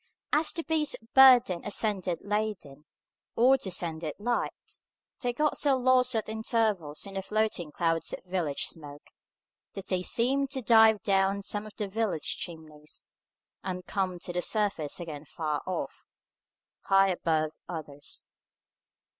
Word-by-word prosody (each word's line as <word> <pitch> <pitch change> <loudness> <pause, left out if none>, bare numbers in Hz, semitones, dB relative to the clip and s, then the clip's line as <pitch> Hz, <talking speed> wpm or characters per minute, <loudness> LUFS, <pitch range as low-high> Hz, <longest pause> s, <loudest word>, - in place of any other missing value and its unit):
As 305 +1 +3
the 330 - -4
beasts 315 -2 +1
of 225 +1 -26
burden 250 -9 +7
ascended 195 -4 0
laden, 205 -9 -3 0.5
or 250 +4 +6
descended 170 - -2
light, 240 +3 -3 0.4
they 245 - -1
got 300 +5 0
so 280 -2 +3
lost 255 -1 +3
at 220 - -1
intervals 215 -8 -1
in 195 - -9
the 195 - -2
floating 210 -5 -1
clouds 165 0 -1
of - - -6
village 175 -6 -2
smoke, 145 -2 -6 0.6
that 195 -1 -7
they 185 -1 +1
seemed 265 +8 +1
to 265 -2 -4
dive 220 -2 +6
down 195 -1 +2
some 205 +2 -4
of 215 - -13
the 210 - -2
village 205 -5 -1
chimneys, 155 -3 -8 0.6
and 180 -1 -4
come 190 -3 -2
to 175 0 -6
the 180 - 0
surface 195 -9 0
again 155 -4 -7
far 150 0 -3
off, 185 - -4 0.8
high 195 0 +5
above 160 -4 0 0.2
others. 150 -4 -7
195 Hz, 140 wpm, -29 LUFS, 165-225 Hz, 0.8 s, burden